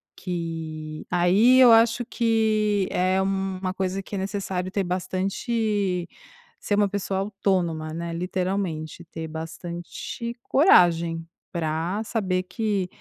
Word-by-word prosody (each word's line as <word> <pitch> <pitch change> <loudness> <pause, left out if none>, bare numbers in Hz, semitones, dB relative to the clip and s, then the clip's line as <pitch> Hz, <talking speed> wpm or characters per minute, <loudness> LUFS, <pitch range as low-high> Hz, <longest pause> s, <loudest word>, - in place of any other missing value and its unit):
que 160 -3 -5
aí 200 +9 +5
eu 245 -2 +9
acho 230 +1 +5
que 215 -4 +1
é 185 +1 +2
uma 190 -1 -1
coisa 190 0 -2
que 200 - -7
é - - -2
necessário 190 -1 -3
ter 195 -1 0
bastante 190 +1 -1 0.5
ser 205 - 0
uma 205 0 +3
pessoa 195 -1 -2
autônoma, 180 -6 -1
né, 170 0 -4
literalmente 180 -2 -2
ter 160 0 -7
bastante 170 +8 -6
coragem 170 - +4 0.2
pra 170 +4 -1
saber 190 -5 -1
que 205 -2 -1
185 Hz, 115 wpm, -25 LUFS, 170-205 Hz, 0.5 s, eu